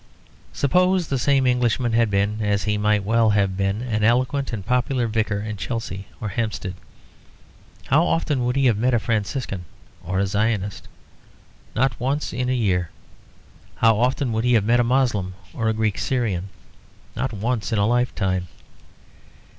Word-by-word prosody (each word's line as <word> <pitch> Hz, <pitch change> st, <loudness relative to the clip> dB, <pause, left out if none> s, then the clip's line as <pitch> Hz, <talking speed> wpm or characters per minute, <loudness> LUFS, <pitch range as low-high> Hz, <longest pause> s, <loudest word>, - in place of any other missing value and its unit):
Suppose 180 Hz, +4 st, +2 dB
the 135 Hz, -, 0 dB
same 135 Hz, 0 st, +2 dB
Englishman 125 Hz, -1 st, +1 dB
had 115 Hz, -1 st, +3 dB
been, 100 Hz, +2 st, 0 dB
as 105 Hz, -1 st, +1 dB
he 105 Hz, 0 st, 0 dB
might 105 Hz, 0 st, +1 dB
well 115 Hz, +2 st, +3 dB
have 100 Hz, -2 st, +2 dB
been, 100 Hz, +4 st, -1 dB
an 110 Hz, -4 st, -1 dB
eloquent 130 Hz, +4 st, +1 dB
and 105 Hz, -5 st, -5 dB
popular 125 Hz, +1 st, +1 dB
vicar 110 Hz, -2 st, -1 dB
in 105 Hz, 0 st, -5 dB
Chelsea 100 Hz, -3 st, -4 dB
or 105 Hz, -, -3 dB
Hampstead. 105 Hz, -3 st, -3 dB, 1.1 s
How -, -, +3 dB
often 85 Hz, -, 0 dB
would 125 Hz, +1 st, 0 dB
he 135 Hz, -1 st, +2 dB
have 115 Hz, -5 st, +3 dB
met 125 Hz, +2 st, +2 dB
a -, -, +3 dB
Franciscan 110 Hz, -3 st, -2 dB, 0.4 s
or 95 Hz, +2 st, -3 dB
a 100 Hz, -, +2 dB
Zionist? 100 Hz, 0 st, -1 dB, 0.9 s
Not 125 Hz, -1 st, +1 dB
once 135 Hz, +4 st, -1 dB
in 125 Hz, +1 st, -1 dB
a -, -, +2 dB
year. 90 Hz, -8 st, 0 dB, 0.9 s
How 115 Hz, -1 st, +3 dB
often 125 Hz, +1 st, +1 dB
would 110 Hz, 0 st, -1 dB
he 125 Hz, 0 st, +3 dB
have 110 Hz, -4 st, +3 dB
met 120 Hz, +2 st, +3 dB
a -, -, +4 dB
Moslem 115 Hz, -7 st, +1 dB, 0.2 s
or 115 Hz, -2 st, 0 dB
a -, -, +1 dB
Greek 110 Hz, -3 st, -1 dB
Syrian? 105 Hz, -8 st, -1 dB, 0.7 s
Not 125 Hz, +3 st, -2 dB
once 110 Hz, +2 st, -2 dB
in 110 Hz, -, +1 dB
a 100 Hz, -, +3 dB
lifetime. 95 Hz, -6 st, 0 dB
110 Hz, 165 wpm, -23 LUFS, 100-125 Hz, 1.1 s, a